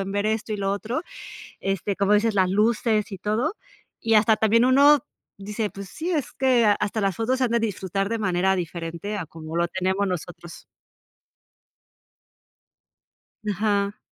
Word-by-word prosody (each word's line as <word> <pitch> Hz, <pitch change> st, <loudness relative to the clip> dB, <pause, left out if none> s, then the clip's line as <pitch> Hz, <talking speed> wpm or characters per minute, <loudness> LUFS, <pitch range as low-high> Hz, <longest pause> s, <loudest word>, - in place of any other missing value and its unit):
en 195 Hz, 0 st, -4 dB
ver 205 Hz, +1 st, -1 dB
esto 220 Hz, 0 st, -1 dB
y -, -, -1 dB
lo 195 Hz, 0 st, 0 dB
otro". 225 Hz, +8 st, -3 dB, 0.6 s
Este, 195 Hz, +1 st, -1 dB
como 200 Hz, +1 st, +3 dB
dices 215 Hz, +1 st, +2 dB
las 190 Hz, -2 st, +3 dB
luces 215 Hz, +1 st, +1 dB
y 195 Hz, -, -5 dB
todo. 215 Hz, -, -1 dB, 0.5 s
Y 225 Hz, 0 st, +1 dB
hasta 215 Hz, 0 st, +5 dB
también 225 Hz, +2 st, +3 dB
uno 285 Hz, +3 st, +6 dB, 0.4 s
dice, 210 Hz, +1 st, -3 dB
pues 200 Hz, -1 st, -9 dB
sí, 340 Hz, +3 st, -4 dB
es 300 Hz, -6 st, -1 dB
que 250 Hz, -3 st, +3 dB
hasta 210 Hz, +1 st, -1 dB
las 195 Hz, -3 st, 0 dB
fotos 250 Hz, +3 st, 0 dB
se 260 Hz, -, +2 dB
han 245 Hz, -, 0 dB
de 235 Hz, -, +3 dB
disfrutar 195 Hz, -2 st, -2 dB
de 230 Hz, +1 st, -2 dB
manera 190 Hz, -2 st, +1 dB
diferente 170 Hz, +3 st, -4 dB
a 170 Hz, -, -5 dB
como 160 Hz, +1 st, -8 dB
lo 170 Hz, 0 st, +2 dB
tenemos 190 Hz, +2 st, -1 dB
nosotros. 175 Hz, -1 st, -7 dB, 2.8 s
Ajá. 205 Hz, 0 st, 0 dB
205 Hz, 160 wpm, -24 LUFS, 190-225 Hz, 2.8 s, uno